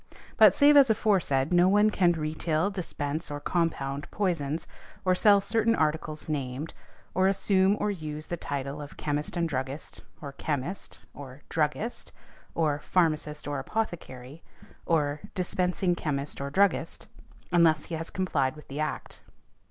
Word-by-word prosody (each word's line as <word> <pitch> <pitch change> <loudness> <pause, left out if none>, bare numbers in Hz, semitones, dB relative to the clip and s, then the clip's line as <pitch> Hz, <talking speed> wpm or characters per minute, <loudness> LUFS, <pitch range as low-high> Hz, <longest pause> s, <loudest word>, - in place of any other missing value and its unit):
But, - - +7
save 290 0 +6
as 275 -3 +7
aforesaid, 180 -10 +2
no 175 +1 +5
one 210 +2 +4
can 180 -4 +3
retail, 160 +3 -1
dispense, 160 -4 -3
or 145 0 -4
compound 145 -3 -2
poisons, 165 -6 -1 0.4
or 185 - +4
sell 200 +2 +5
certain 225 +3 +1
articles 155 -1 -1
named, 140 0 -3 0.4
or 185 +1 +3
assume 195 0 +2
or 210 - 0
use 155 -4 -6
the 175 - -3
title 140 -2 -4
of 145 - -10
"Chemist 150 +3 -3
and 170 -1 +1
Druggist," 135 0 -5 0.2
or 145 -4 -7
"Chemist," 145 +5 -4 0.2
or 135 0 -10
"Druggist," 160 +9 -2 0.4
or 150 -3 +1
"Pharmacist 155 -3 0
or 145 -1 -2
Apothecary," 160 - -5 0.5
or 150 -3 +1 0.2
"Dispensing 180 0 0
Chemist 145 -4 -3
or 140 - -3
Druggist," 185 -1 +1 0.5
unless 165 -3 +4
he 170 - -8
has 165 +1 -4
complied 155 -8 0
with 150 - -14
the 140 +2 -5
Act. 155 0 -4
160 Hz, 145 wpm, -28 LUFS, 145-185 Hz, 0.5 s, But